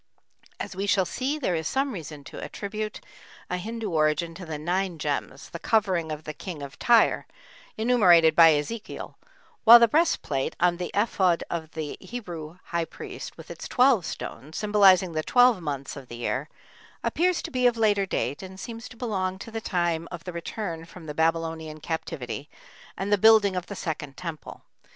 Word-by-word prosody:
As -, -, -5 dB
we 195 Hz, +2 st, -2 dB
shall 195 Hz, -2 st, +3 dB
see, 265 Hz, -, -2 dB
there 255 Hz, -11 st, -1 dB
is 160 Hz, -1 st, -1 dB
some 270 Hz, -, 0 dB
reason 155 Hz, -, -7 dB
to -, -, -9 dB
attribute 215 Hz, +1 st, -5 dB, 0.5 s
a 180 Hz, -, 0 dB
Hindu 220 Hz, +2 st, -4 dB
origin 155 Hz, +1 st, +1 dB
to 180 Hz, 0 st, -9 dB
the 155 Hz, -1 st, -4 dB
nine 175 Hz, +3 st, -1 dB
gems, 145 Hz, -2 st, -3 dB
"the 170 Hz, -, -6 dB
covering" 185 Hz, -8 st, +1 dB
of 155 Hz, 0 st, -5 dB
the 155 Hz, -, -6 dB
King 160 Hz, -3 st, -7 dB
of 140 Hz, 0 st, -9 dB
Tyre, 235 Hz, -2 st, +4 dB, 0.5 s
enumerated 185 Hz, -9 st, +5 dB
by 165 Hz, -1 st, +8 dB
Ezekiel, 205 Hz, +10 st, -5 dB, 0.5 s
while 235 Hz, +1 st, +11 dB
the 235 Hz, 0 st, +6 dB
breastplate 220 Hz, -, +1 dB
on 175 Hz, 0 st, +3 dB
the 180 Hz, -, -4 dB
ephod 190 Hz, -5 st, +2 dB
of 160 Hz, -2 st, -3 dB
the 155 Hz, -2 st, -5 dB
Hebrew 175 Hz, -9 st, -7 dB
high 170 Hz, -1 st, -2 dB
priest, -, -, -9 dB
with -, -, -10 dB
its -, -, -7 dB
twelve 250 Hz, -6 st, +4 dB
stones, 150 Hz, +4 st, -7 dB
symbolizing 200 Hz, -4 st, +5 dB
the 155 Hz, -1 st, -1 dB
twelve 245 Hz, +1 st, +4 dB
months 140 Hz, -3 st, -4 dB
of 135 Hz, -3 st, -10 dB
the 120 Hz, -, -8 dB
year, 130 Hz, +5 st, -2 dB, 0.5 s
appears 360 Hz, +1 st, +1 dB
to -, -, -6 dB
be 250 Hz, -1 st, +3 dB
of 240 Hz, -1 st, +1 dB
later 205 Hz, -3 st, +2 dB
date, 145 Hz, -6 st, -2 dB
and 190 Hz, 0 st, -9 dB
seems 230 Hz, +2 st, -7 dB
to 230 Hz, -, -14 dB
belong 190 Hz, -6 st, -2 dB
to 225 Hz, -, -9 dB
the 225 Hz, 0 st, -4 dB
time 170 Hz, -4 st, -1 dB
of 175 Hz, -2 st, -8 dB
the 180 Hz, -, -6 dB
return 170 Hz, -1 st, -5 dB
from 165 Hz, 0 st, -12 dB
the 150 Hz, -, -5 dB
Babylonian 160 Hz, -1 st, -1 dB
Captivity 150 Hz, -3 st, -5 dB, 0.5 s
and 200 Hz, +2 st, -1 dB
the 205 Hz, -, +3 dB
building 215 Hz, -2 st, +6 dB
of 180 Hz, -1 st, -3 dB
the 200 Hz, -, -6 dB
second 145 Hz, -6 st, -5 dB
temple. 165 Hz, -4 st, -7 dB
180 Hz, 185 wpm, -26 LUFS, 160-215 Hz, 0.5 s, while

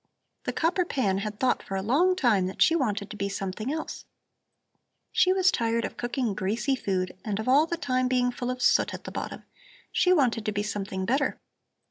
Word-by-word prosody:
The -, -, 0 dB
copper 350 Hz, +3 st, +1 dB
pan 210 Hz, -, 0 dB
had 210 Hz, +1 st, -5 dB
thought 255 Hz, -1 st, +2 dB
for 195 Hz, -, -6 dB
a 190 Hz, -, -2 dB
long 325 Hz, -, +3 dB
time 220 Hz, -, +2 dB
that 190 Hz, -, -7 dB
she 330 Hz, -, +5 dB
wanted 210 Hz, -9 st, -1 dB
to -, -, -6 dB
be 200 Hz, -1 st, -2 dB
something 195 Hz, +5 st, -3 dB
else. 315 Hz, +1 st, -5 dB, 1.1 s
She 365 Hz, -, +4 dB
was 375 Hz, 0 st, +4 dB
tired 230 Hz, -1 st, 0 dB
of -, -, -6 dB
cooking 240 Hz, -2 st, -2 dB
greasy 215 Hz, +7 st, 0 dB
food 185 Hz, -7 st, -2 dB
and 205 Hz, -3 st, -2 dB
of 220 Hz, -, -4 dB
all 285 Hz, +5 st, +5 dB
the 340 Hz, -, -2 dB
time 255 Hz, -4 st, 0 dB
being 250 Hz, -1 st, +2 dB
full 245 Hz, 0 st, -4 dB
of 255 Hz, 0 st, -3 dB
soot -, -, +3 dB
at -, -, -10 dB
the -, -, -7 dB
bottom; -, -, -5 dB, 0.5 s
she 360 Hz, -, +3 dB
wanted 250 Hz, -10 st, +3 dB
to -, -, +2 dB
be 205 Hz, 0 st, -1 dB
something 195 Hz, -3 st, -3 dB
better. 265 Hz, +5 st, 0 dB
240 Hz, 205 wpm, -27 LUFS, 205-275 Hz, 1.1 s, she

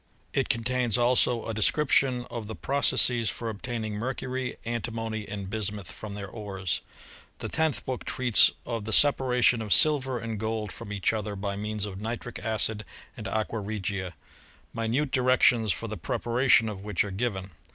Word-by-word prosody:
It 135 Hz, -, 0 dB
contains 125 Hz, -2 st, +1 dB
also 120 Hz, -1 st, +3 dB
a 115 Hz, -, -3 dB
description 125 Hz, +2 st, +2 dB
of 115 Hz, -3 st, -5 dB
the 110 Hz, -, -6 dB
processes 125 Hz, -4 st, +3 dB
for 115 Hz, -, -4 dB
obtain 115 Hz, +1 st, -5 dB
ing 110 Hz, -, -4 dB
mercury, 130 Hz, +3 st, -3 dB
antimony, 115 Hz, -2 st, -3 dB
and 100 Hz, -2 st, -5 dB
bismuth, 105 Hz, -2 st, -4 dB
from 105 Hz, -2 st, -8 dB
their 100 Hz, -1 st, -6 dB
ores. 95 Hz, -3 st, -4 dB, 0.6 s
The -, -, -5 dB
tenth 160 Hz, -3 st, 0 dB
book 130 Hz, -2 st, -4 dB
treats 125 Hz, -4 st, +5 dB, 0.2 s
of 115 Hz, -3 st, -4 dB
the 110 Hz, -, -2 dB
separation 125 Hz, -4 st, +4 dB
of 105 Hz, -2 st, -5 dB
silver 135 Hz, -3 st, +4 dB
and 115 Hz, -2 st, -4 dB
gold 110 Hz, -2 st, -3 dB
from 100 Hz, +3 st, -9 dB
each 100 Hz, +1 st, 0 dB
other, 105 Hz, -2 st, -3 dB
by 100 Hz, 0 st, -3 dB
means 105 Hz, 0 st, -3 dB
of 100 Hz, -1 st, -7 dB
nitric 120 Hz, +2 st, -5 dB
acid 110 Hz, -1 st, +1 dB, 0.3 s
and -, -, -7 dB
aqua 110 Hz, +1 st, -2 dB
regia: 100 Hz, -3 st, -4 dB, 0.6 s
minute 120 Hz, +6 st, -1 dB
directions 125 Hz, -3 st, +4 dB
for 115 Hz, -, -3 dB
the 110 Hz, 0 st, -5 dB
preparation 120 Hz, +5 st, +2 dB
of 100 Hz, -3 st, -6 dB
which 105 Hz, -4 st, 0 dB
are 105 Hz, -, -6 dB
given. 95 Hz, -2 st, -3 dB
110 Hz, 165 wpm, -27 LUFS, 105-125 Hz, 0.6 s, treats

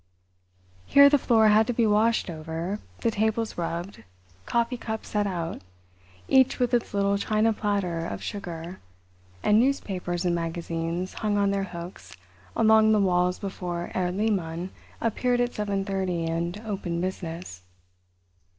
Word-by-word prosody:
Here 280 Hz, 0 st, +8 dB
the 290 Hz, -, +5 dB
floor 225 Hz, -3 st, +4 dB
had 215 Hz, +1 st, +5 dB
to 245 Hz, -, 0 dB
be 230 Hz, 0 st, +2 dB
washed 220 Hz, +2 st, +3 dB
over, 165 Hz, +4 st, -4 dB, 0.2 s
the 230 Hz, -, +2 dB
tables 220 Hz, +1 st, 0 dB
rubbed, 170 Hz, +3 st, -4 dB, 0.5 s
coffee 235 Hz, +1 st, +1 dB
cups 220 Hz, -2 st, -5 dB
set 205 Hz, -1 st, 0 dB
out, 170 Hz, -3 st, -4 dB, 0.7 s
each 260 Hz, -1 st, +4 dB
with 245 Hz, -2 st, 0 dB
its 235 Hz, -3 st, 0 dB
little 200 Hz, 0 st, +2 dB
china 215 Hz, +2 st, +2 dB
platter 200 Hz, -6 st, -1 dB
of -, -, -6 dB
sugar, 175 Hz, -3 st, -6 dB, 0.6 s
and 210 Hz, +1 st, +5 dB
newspapers 190 Hz, -9 st, -1 dB
and 175 Hz, -, +2 dB
magazines 170 Hz, +1 st, -3 dB
hung 210 Hz, -2 st, -1 dB
on 200 Hz, -1 st, +2 dB
their 195 Hz, -1 st, 0 dB
hooks 170 Hz, -, -9 dB, 0.4 s
along 220 Hz, 0 st, +5 dB
the 215 Hz, -, +4 dB
walls 180 Hz, -2 st, +2 dB
before 180 Hz, -3 st, -4 dB
Herr 180 Hz, -1 st, 0 dB
Lehmann 185 Hz, -3 st, -1 dB, 0.3 s
appeared 245 Hz, +2 st, +1 dB
at 245 Hz, 0 st, 0 dB
seven 200 Hz, -2 st, -2 dB
thirty 190 Hz, -4 st, -1 dB
and 170 Hz, +4 st, -2 dB
opened 190 Hz, -5 st, -3 dB
business. 170 Hz, -, -5 dB
195 Hz, 140 wpm, -26 LUFS, 175-220 Hz, 0.7 s, Here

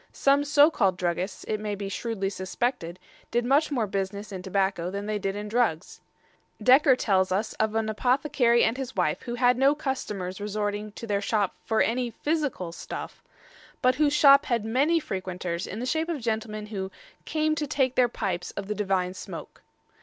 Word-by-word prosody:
Some 280 Hz, +1 st, +3 dB
so 295 Hz, +2 st, +5 dB
called 195 Hz, -, +1 dB
druggists, 180 Hz, +2 st, -2 dB
it 215 Hz, -, -2 dB
may 210 Hz, -1 st, -3 dB
be 200 Hz, 0 st, -5 dB
shrewdly 195 Hz, -1 st, -3 dB
suspected, 190 Hz, -1 st, -3 dB, 0.3 s
did 240 Hz, 0 st, 0 dB
much 280 Hz, +5 st, +3 dB
more 245 Hz, -6 st, +1 dB
business 200 Hz, +1 st, -4 dB
in 190 Hz, -2 st, -5 dB
tobacco 190 Hz, -2 st, 0 dB
than 200 Hz, +2 st, -4 dB
they 210 Hz, 0 st, -2 dB
did 195 Hz, 0 st, -2 dB
in 210 Hz, +1 st, -5 dB
drugs. 210 Hz, -7 st, -1 dB, 0.6 s
Dekker 265 Hz, +1 st, +6 dB
tells 190 Hz, -4 st, +2 dB
us 205 Hz, +4 st, -1 dB
of 220 Hz, 0 st, +1 dB
an 225 Hz, -1 st, +1 dB
apothecary 245 Hz, +1 st, +2 dB
and 230 Hz, -, +1 dB
his 265 Hz, -2 st, -5 dB
wife -, -, 0 dB
who 240 Hz, -1 st, -5 dB
had 245 Hz, 0 st, +3 dB
no 275 Hz, +2 st, +4 dB
customers 210 Hz, -, -4 dB
resorting 210 Hz, 0 st, -3 dB
to 230 Hz, -, -7 dB
their 205 Hz, -2 st, 0 dB
shop 205 Hz, -2 st, 0 dB
"for 220 Hz, -1 st, +1 dB
any 245 Hz, +1 st, 0 dB
phisicall 290 Hz, -, -2 dB
stuffe," -, -, -7 dB, 0.6 s
but 255 Hz, 0 st, +5 dB
whose 290 Hz, +2 st, +2 dB
shop 280 Hz, -1 st, +7 dB
had 235 Hz, -5 st, 0 dB
many 280 Hz, +9 st, +2 dB
frequenters 185 Hz, -, -4 dB
in 205 Hz, -, -6 dB
the 245 Hz, -, -3 dB
shape 320 Hz, +5 st, -1 dB
of 325 Hz, -4 st, -2 dB
gentlemen 220 Hz, -2 st, -3 dB
who 190 Hz, -1 st, -3 dB, 0.4 s
"came 310 Hz, 0 st, +1 dB
to 300 Hz, -1 st, -2 dB
take 260 Hz, -2 st, +1 dB
their 250 Hz, -2 st, +3 dB
pipes 180 Hz, -5 st, -3 dB
of 200 Hz, -, -3 dB
the 210 Hz, -, -1 dB
divine 190 Hz, -3 st, 0 dB
smoake." -, -, -9 dB
215 Hz, 185 wpm, -26 LUFS, 195-260 Hz, 0.6 s, shop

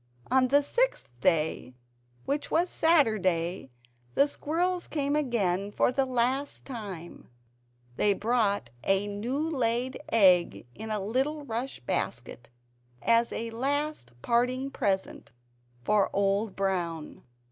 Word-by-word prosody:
On 260 Hz, 0 st, +4 dB
the 285 Hz, +3 st, +4 dB
sixth -, -, 0 dB
day, 155 Hz, -6 st, 0 dB, 0.5 s
which 285 Hz, +1 st, -2 dB
was 345 Hz, +2 st, +1 dB
Saturday, 190 Hz, -, +2 dB, 0.5 s
the 280 Hz, -, +5 dB
squirrels 345 Hz, +5 st, -1 dB
came 285 Hz, -1 st, -1 dB
again 205 Hz, -9 st, 0 dB
for 245 Hz, -, +2 dB
the 265 Hz, +1 st, 0 dB
last 255 Hz, +3 st, -1 dB
time; 200 Hz, -10 st, -8 dB, 0.7 s
they 205 Hz, -1 st, +3 dB
brought 205 Hz, -, 0 dB
a 195 Hz, +1 st, +2 dB
new 240 Hz, +10 st, -2 dB
laid 255 Hz, -3 st, -1 dB
EGG 180 Hz, -, +4 dB
in 220 Hz, -, -8 dB
a 215 Hz, -1 st, -1 dB
little 265 Hz, +9 st, -1 dB
rush 245 Hz, +2 st, -4 dB
basket 120 Hz, 0 st, -4 dB, 0.5 s
as 230 Hz, 0 st, +3 dB
a 230 Hz, 0 st, -4 dB
last 280 Hz, -, -2 dB
parting 250 Hz, +3 st, +1 dB
present 190 Hz, -, -2 dB, 0.5 s
for 205 Hz, +6 st, +3 dB
Old 200 Hz, +1 st, +1 dB
Brown. 175 Hz, -5 st, -2 dB
230 Hz, 115 wpm, -28 LUFS, 195-275 Hz, 0.7 s, the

